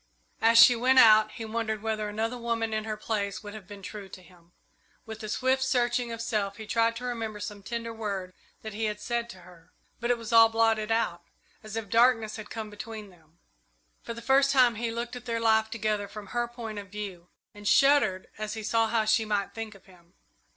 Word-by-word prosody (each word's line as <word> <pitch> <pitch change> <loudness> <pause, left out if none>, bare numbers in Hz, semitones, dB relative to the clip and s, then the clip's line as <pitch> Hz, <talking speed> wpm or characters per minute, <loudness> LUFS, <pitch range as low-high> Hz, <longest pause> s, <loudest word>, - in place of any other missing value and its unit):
As 230 +1 +5
she 245 +1 +9
went 255 +3 +2
out, 215 -2 +7
he 225 - -6
wondered 220 -1 -3
whether 215 -1 -2
another 220 +3 -2
woman 230 -1 -2
in 215 0 -2
her 215 -1 -4
place 210 -1 -3
would 205 -1 -8
have 210 -4 -10
been 200 -1 -11
true 200 0 -8
to 185 - -11
him. 175 -2 -21 0.5
With 220 -1 -8
a 215 - -6
swift 260 +4 +1
searching 245 -2 +1
of 230 0 -5
self 205 -4 -2
he 220 - -8
tried 230 +1 +1
to 240 - -7
remember 225 -4 -4
some 205 0 -6
tender 230 +2 -5
word 200 -4 -4 0.3
that 220 -1 -6
he 220 +2 -2
had 210 -1 -2
said 235 +2 -2
to 185 -5 -11
her, 170 -2 -18 0.3
but 235 - -2
it 245 - +3
was 230 0 -6
all 225 0 +8
blotted 225 -1 +1
out, 225 -7 0 0.4
as 215 0 -9
if 225 -2 -4
darkness 225 0 +3
had 215 -1 -9
come 220 -2 -6
between 210 -1 -8
them. 165 -2 -24 0.6
For 230 - -7
the 235 - -9
first 270 +2 +4
time 255 -3 +5
he 230 +1 -3
looked 235 +2 -4
at 245 0 -9
their 230 -1 -2
life 220 -1 +3
together 215 -2 -2
from 205 0 -10
her 240 0 0
point 230 -3 -7
of 200 -2 -10
view, 190 -4 -7 0.2
and 205 0 -8
shuddered 240 -10 +4
as 215 0 -4
he 220 - -6
saw 225 +1 +2
how 220 -1 +1
she 220 +1 +3
might 205 -2 -2
think 225 -2 -6
of 195 - -18
him. 180 -1 -21
220 Hz, 220 wpm, -28 LUFS, 210-230 Hz, 0.6 s, she